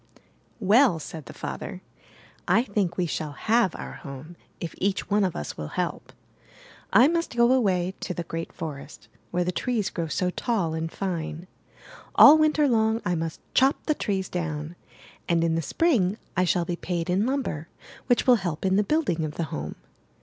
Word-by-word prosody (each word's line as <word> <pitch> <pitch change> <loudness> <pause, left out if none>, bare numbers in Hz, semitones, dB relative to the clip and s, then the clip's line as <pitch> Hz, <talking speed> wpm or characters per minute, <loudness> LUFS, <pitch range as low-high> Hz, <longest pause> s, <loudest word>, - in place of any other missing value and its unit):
''Well," 215 -2 +4
said 155 -3 -8
the - - -8
father, - - -6 0.6
"I 225 - +4
think 200 -6 -1
we 180 - +1
shall 155 -2 -3
have 220 +3 +2
our - - -7
home 140 +4 -9 0.2
if 170 - -5
each 195 +1 -1
one 205 0 +3
of 185 -3 0
us 75 - -5
will 75 - -5
help. - - -3 0.8
I 235 +7 +7
must 335 -4 -1
go 235 +1 +5
away 190 -7 +1
to 180 - -4
the 175 - -3
great 165 0 -5
forest, 150 -2 -8 0.2
where 180 0 0
the 180 - -1
trees 225 +1 -1
grow 170 -2 -3
so 180 +3 -1
tall 190 -7 -1
and 160 0 -3
fine. 170 -3 -4 0.7
All 305 +2 +9
Winter 305 -1 +3
long 220 -2 +2
I 175 - +1
must 165 -1 -3
chop 265 +2 +3
the 305 - +2
trees 195 -9 -2
down, 160 -2 -4 0.5
and 170 -1 +3
in 165 -1 +2
the 165 - 0
Spring 210 - +1 0.2
I 185 - +3
shall 175 0 +1
be 175 - -2
paid 175 -2 -3
in 190 +5 +1
lumber, 255 - -2 0.4
which 245 -2 +3
will 250 -2 +6
help 175 -4 -4
in 190 0 +3
the 210 - +4
building 270 - 0
of 155 -1 -4
the 170 - -1
home. 75 +1 -4
180 Hz, 185 wpm, -26 LUFS, 165-225 Hz, 0.8 s, All